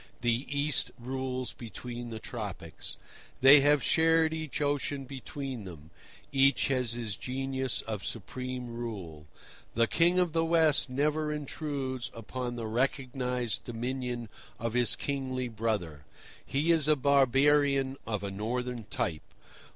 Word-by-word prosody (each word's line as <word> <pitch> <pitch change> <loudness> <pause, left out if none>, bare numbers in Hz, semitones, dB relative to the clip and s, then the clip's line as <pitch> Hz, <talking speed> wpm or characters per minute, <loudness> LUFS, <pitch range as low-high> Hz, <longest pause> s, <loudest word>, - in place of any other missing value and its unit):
The 120 +2 +1
East 145 +1 +1
rules 130 0 -3
between 120 +1 -7
the 115 - -5
Tropics. 105 -7 -5 0.4
They 135 +3 +10
have 145 -1 +4
shared 160 0 +4
each 160 -3 -3
ocean 145 -1 -1
between 135 -2 -6
them. 80 -4 -11 0.4
Each 135 0 +4
has 125 -4 +1
his 115 -4 -3
genius 130 +1 -2
of 110 -3 -4
supreme 125 +3 -4
rule. 100 -11 -6 0.5
The 115 +1 +4
King 170 +8 +3
of 180 -3 +2
the 165 0 +2
West 160 -4 +4
never 150 +3 0
intrudes 140 -3 -3
upon 120 +2 -4
the 115 -2 -4
recognised 125 0 -1
dominion 120 0 -3 0.3
of 115 -2 -3
his 120 -1 +5
kingly 130 -3 -2
brother. 105 -10 -2 0.4
He 150 +5 +1
is 160 -3 +4
a 155 - +6
barbarian, 140 0 +3
of 105 -3 -2
a 100 - -3
northern 120 +3 -3
type. 80 -4 -2
130 Hz, 130 wpm, -30 LUFS, 115-140 Hz, 0.5 s, They